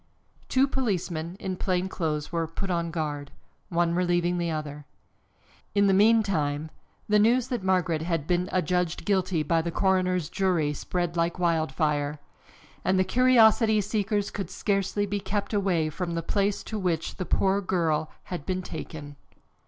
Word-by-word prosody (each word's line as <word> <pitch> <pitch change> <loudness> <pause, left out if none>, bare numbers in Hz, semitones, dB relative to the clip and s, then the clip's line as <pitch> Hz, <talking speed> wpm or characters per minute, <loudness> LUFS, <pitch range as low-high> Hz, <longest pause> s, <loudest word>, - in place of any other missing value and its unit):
Two 265 +1 +3
policemen, 185 - -2
in 190 -3 -3
plain 180 0 -1
clothes, 155 -5 -3
were 165 -1 -1
put 185 +4 -4
on 170 -1 -1
guard, 150 -3 -3 0.4
one 170 -1 +1
relieving 175 0 +1
the 170 -1 -1
other. 150 -2 -5 0.9
In 200 0 +4
the 195 - +4
meantime 190 -8 +2 0.4
the 210 0 +4
news 240 +4 +3
that 245 -5 -2
Margaret 180 -4 +1
had 165 -3 -1
been 180 +2 0
adjudged 180 -1 0
guilty 185 -5 +1
by 165 +2 +2
the 170 - -3
coroner's 185 -2 +1
jury 175 -6 0
spread 175 +3 -3
like 170 +1 0
wild 165 -4 +1
fire, 150 0 0 0.7
and 185 0 +2
the 185 - +4
curiosity 225 -2 +5
seekers 205 0 -1
could 195 - -4
scarcely 200 0 0
be 205 0 -2
kept 200 +2 -3
away 180 -6 +1
from 170 +1 -3
the 165 - -2
place 200 +3 0
to 220 - -4
which 170 -4 -2
the 185 - -3
poor 195 +1 +2
girl 160 -5 0
had 180 -5 -6
been 185 +3 -2
taken. 150 -4 -8
180 Hz, 160 wpm, -27 LUFS, 160-195 Hz, 0.9 s, curiosity